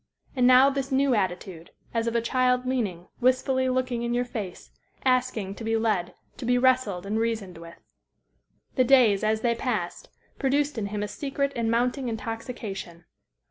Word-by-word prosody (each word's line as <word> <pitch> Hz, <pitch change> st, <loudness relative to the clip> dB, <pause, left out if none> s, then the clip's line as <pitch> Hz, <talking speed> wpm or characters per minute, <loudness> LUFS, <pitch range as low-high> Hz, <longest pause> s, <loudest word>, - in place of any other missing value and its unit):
And 250 Hz, -1 st, +4 dB
now 255 Hz, +2 st, +7 dB
this 275 Hz, 0 st, -3 dB
new 270 Hz, 0 st, +3 dB
attitude, 185 Hz, -4 st, -2 dB, 0.2 s
as 230 Hz, 0 st, 0 dB
of 230 Hz, -, -1 dB
a 235 Hz, -, +3 dB
child 250 Hz, +1 st, +1 dB
leaning, 205 Hz, -9 st, -2 dB
wistfully 260 Hz, +1 st, +2 dB
looking 255 Hz, -2 st, -1 dB
in 235 Hz, 0 st, -1 dB
your 245 Hz, 0 st, +1 dB
face, 210 Hz, -7 st, -7 dB, 0.3 s
asking 250 Hz, -6 st, +1 dB
to 225 Hz, -, -9 dB
be 225 Hz, 0 st, +1 dB
led, 210 Hz, -6 st, 0 dB, 0.2 s
to -, -, -6 dB
be 245 Hz, +1 st, +3 dB
wrestled 245 Hz, -8 st, +2 dB
and 215 Hz, +2 st, -1 dB
reasoned 220 Hz, -7 st, -2 dB
with. 170 Hz, 0 st, -11 dB, 1.0 s
The 255 Hz, -, +3 dB
days, 240 Hz, -6 st, +5 dB
as 215 Hz, 0 st, +1 dB
they 235 Hz, -1 st, +2 dB
passed, 225 Hz, -7 st, -3 dB, 0.3 s
produced 280 Hz, -1 st, +1 dB
in 200 Hz, -, -2 dB
him 205 Hz, 0 st, -3 dB
a -, -, -2 dB
secret 280 Hz, +4 st, -2 dB
and 230 Hz, -1 st, 0 dB
mounting 245 Hz, +2 st, 0 dB
intoxication. 220 Hz, -6 st, -6 dB
235 Hz, 170 wpm, -26 LUFS, 205-255 Hz, 1.0 s, now